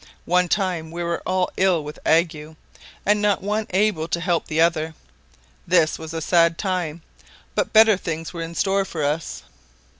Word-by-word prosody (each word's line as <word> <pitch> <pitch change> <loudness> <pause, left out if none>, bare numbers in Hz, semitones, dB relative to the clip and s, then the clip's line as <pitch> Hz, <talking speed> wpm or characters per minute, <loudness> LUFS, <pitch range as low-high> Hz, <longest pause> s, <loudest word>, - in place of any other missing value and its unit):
One 180 0 +2
time 180 -5 -1
we 170 +1 -5
were 170 0 -2
all 185 0 0
ill 185 -5 +2
with 150 +1 -8
ague, 160 -1 +1 0.5
and 210 +1 +3
not 205 -2 +1
one 210 +2 -1
able 190 -4 +1
to 170 - -1
help 175 -1 -1
the 155 0 -2
other; 160 -1 +1 0.7
this 170 -3 +3
was 160 0 -7
a 165 0 -4
sad 170 -1 +3
time; 175 -5 -3 0.5
but - - -1
better 220 -2 +6
things 165 -2 -5
were 170 - -5
in 165 0 -6
store 195 +2 +1
for 165 -5 -5
us. 150 +3 -3
170 Hz, 175 wpm, -22 LUFS, 160-190 Hz, 0.7 s, better